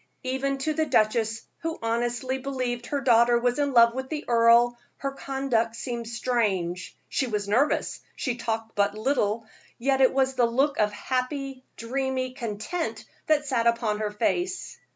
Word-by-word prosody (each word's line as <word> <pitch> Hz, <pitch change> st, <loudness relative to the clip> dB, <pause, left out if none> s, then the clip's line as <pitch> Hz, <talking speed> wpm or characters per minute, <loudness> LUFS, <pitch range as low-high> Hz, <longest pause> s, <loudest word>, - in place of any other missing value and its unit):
Even 265 Hz, +1 st, -1 dB
to 310 Hz, +3 st, -1 dB
the 315 Hz, 0 st, 0 dB
duchess, 220 Hz, +1 st, +1 dB, 0.2 s
who 330 Hz, 0 st, -3 dB
honestly 240 Hz, +3 st, -1 dB
believed 255 Hz, -3 st, -3 dB
her 285 Hz, -1 st, -1 dB
daughter 235 Hz, -2 st, +5 dB
was 245 Hz, +2 st, 0 dB
in 285 Hz, -1 st, +1 dB
love 235 Hz, -2 st, +6 dB
with 260 Hz, +1 st, -5 dB
the 310 Hz, -1 st, -4 dB
earl, 235 Hz, +1 st, +5 dB, 0.2 s
her 275 Hz, -, -3 dB
conduct 270 Hz, -5 st, -1 dB
seemed 235 Hz, -1 st, -4 dB
strange. 210 Hz, -7 st, -1 dB
She 265 Hz, -, -1 dB
was 210 Hz, -3 st, -2 dB
nervous, 250 Hz, +9 st, +1 dB, 0.2 s
she 255 Hz, -, -1 dB
talked 225 Hz, -1 st, -3 dB
but 205 Hz, +1 st, +1 dB
little, 220 Hz, -2 st, 0 dB, 0.3 s
yet 270 Hz, +2 st, +1 dB
it 260 Hz, -, +6 dB
was 265 Hz, 0 st, +1 dB
the 245 Hz, -2 st, +3 dB
look 275 Hz, +5 st, +1 dB
of 210 Hz, -1 st, +3 dB
happy, 260 Hz, +3 st, -3 dB
dreamy 260 Hz, +1 st, -2 dB
content 240 Hz, -, -4 dB, 0.2 s
that 305 Hz, -2 st, +3 dB
sat 240 Hz, -4 st, +1 dB, 0.2 s
on 210 Hz, -1 st, 0 dB
her 215 Hz, -1 st, -1 dB
face. 355 Hz, -, -2 dB
245 Hz, 160 wpm, -26 LUFS, 230-270 Hz, 0.3 s, love